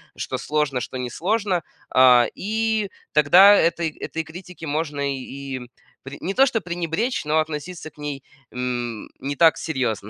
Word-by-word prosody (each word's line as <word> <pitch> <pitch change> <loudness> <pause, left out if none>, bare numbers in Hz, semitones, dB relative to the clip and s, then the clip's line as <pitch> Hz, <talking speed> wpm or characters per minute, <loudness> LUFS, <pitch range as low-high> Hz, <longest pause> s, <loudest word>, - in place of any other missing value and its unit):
что - - -4
сложно, 150 -4 -1
что 130 - -6
несложно, 180 - -1 0.3
a. 125 -2 +7
И 220 0 -1 0.2
тогда 175 +7 +7
этой 170 -3 +2
этой 160 - -4
критики 170 +1 -10
можно 150 -1 -2
и 135 0 -6 0.4
пре 140 +2 -8
не 190 - -2
то 270 +5 +5
что 240 -4 0
пренебречь, 175 +6 -2
но 150 +1 +1
относиться 155 +2 -4
к - - -35
ней, 145 -2 -5 0.3
м, 120 -3 -4
не 140 +1 -4
так 165 +2 +5
серьезно. 125 -9 -2
155 Hz, 150 wpm, -23 LUFS, 135-180 Hz, 0.4 s, a